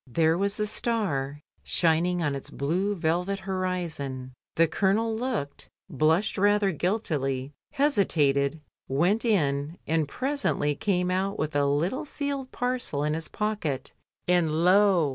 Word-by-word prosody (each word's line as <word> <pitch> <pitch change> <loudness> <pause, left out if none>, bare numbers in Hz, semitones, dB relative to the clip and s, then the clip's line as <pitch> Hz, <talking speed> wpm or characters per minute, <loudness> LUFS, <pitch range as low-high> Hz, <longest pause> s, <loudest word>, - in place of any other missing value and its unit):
There 160 +6 +2
was 200 +3 0
the 210 - 0
star 155 - -1 0.2
shining 170 +1 +1
on 145 -2 0
its 140 - -6
blue 180 +9 -1
velvet 180 +3 0
horizon, 175 -9 -3 0.2
the 165 0 +4
Colonel 210 +6 +1
looked, 220 - -4 0.2
blushed 160 +9 +1
rather 205 0 +3
guiltily, 145 - -1 0.2
hesitated, 155 - +2 0.3
went 175 +11 +2
in, 150 - +1
and 160 -2 +1
presently 260 - 0
came 180 +3 0
out 195 +2 -1
with 155 -1 -3
a 145 -1 +3
little 165 - 0
sealed 280 -2 -4
parcel 245 - -1
in 150 0 0
his 160 0 -3
pocket, 185 -11 -3 0.3
and 175 -3 +3
lo! 185 -4 +5
175 Hz, 130 wpm, -27 LUFS, 145-205 Hz, 0.3 s, lo